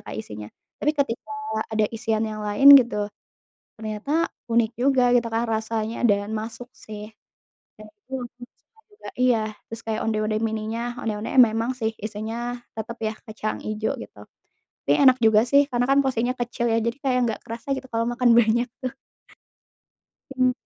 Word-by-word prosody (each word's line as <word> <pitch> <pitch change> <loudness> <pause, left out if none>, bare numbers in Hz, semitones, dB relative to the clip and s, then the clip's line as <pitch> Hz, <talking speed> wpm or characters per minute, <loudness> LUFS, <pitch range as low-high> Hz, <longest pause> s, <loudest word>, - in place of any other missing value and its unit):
Kak - - -7
isinya? 105 -1 -7 0.3
Tapi 300 - +2
ketika 275 -3 -1 0.4
ada 215 -1 +2
isian 225 -1 -1
yang 215 -1 -5
lain 210 +7 +7
gitu, 210 -4 -3 0.7
ternyata 220 +10 -1 0.2
unik 230 -1 +2
juga 260 0 +3
gitu 235 - 0
kan 230 0 0
rasanya 220 +1 -1
dan 205 -1 +2
masuk 225 +3 -6
sih. 210 0 -9 0.7
Kayak 215 0 -12 0.2
gitu 265 - -7
aku 245 0 -11 0.2
suka 450 - -38
juga 415 - -12
iya. 250 -2 +4 0.3
Terus 225 0 -8
kayak 220 -1 -3
onde-onde 215 -1 0
mini, 220 -1 -3 0.3
onde-onde 215 -2 -4
memang 225 +1 +1
sih 225 -3 -1
isinya 225 +3 -4 0.2
tetap 225 +2 -6
ya 215 0 0
kacang 215 0 -4
ijo 215 0 -2
gitu. - - -11 0.6
Tapi - - +4
enak 260 -1 +7
juga 220 0 +6
sih 280 +2 +6
karena 245 -1 +1
kan 275 - +5
porsinya 250 0 0
kecil 240 0 -2
ya 225 - +3
jadi 235 +3 -1
kayak 255 -2 +1
nggak 220 - -3
kerasa 230 +4 -8
gitu 260 0 -7
kalau 230 0 0
makan 240 0 +2
banyak 235 +2 +3
tuh. 255 0 -2 1.4
Hmm. 255 -1 +3
225 Hz, 165 wpm, -24 LUFS, 215-245 Hz, 1.4 s, lain